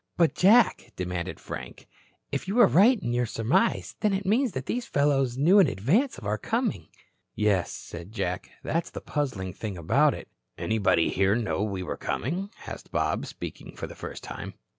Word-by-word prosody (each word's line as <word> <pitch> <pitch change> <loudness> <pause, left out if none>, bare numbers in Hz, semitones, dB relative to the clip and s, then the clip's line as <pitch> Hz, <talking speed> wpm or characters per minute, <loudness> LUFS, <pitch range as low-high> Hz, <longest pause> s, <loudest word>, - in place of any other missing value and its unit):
"But, 170 -2 +4
Jack," 220 +4 +4
demanded 90 0 -4
Frank, - - -8 0.4
"if - - -3
you 205 +6 0
are 240 - +9
right 210 +7 +5
in 120 -10 -2
your 120 0 +1
surmise, 115 - +1
then 210 -2 +2
it 195 0 -2
means 225 +3 +2
that 130 0 -4
these 245 0 -2
fellows 135 -3 +1
knew 175 +9 +6
in 190 - +6
advance 160 - +1
of 120 - -10
our 105 +1 -1
coming." 225 - -1 0.5
"Yes," 105 -4 +1
said 85 +3 -8
Jack, 90 -5 -3
"that's 165 +2 -1
the - - -7
puzzling 110 -12 -3
thing 105 -2 -5
about 80 -2 +3
it." - - -9 0.3
"Anybody 95 -6 +2
here 95 +2 +2
know 115 -4 -1
we 100 -3 -2
were 90 - -4
coming?" 180 - -2 0.2
asked - - -8
Bob, - - 0
speaking - - -8
for - - -5
the - - -9
first - - -8
time. - - -7
130 Hz, 185 wpm, -27 LUFS, -, 0.5 s, are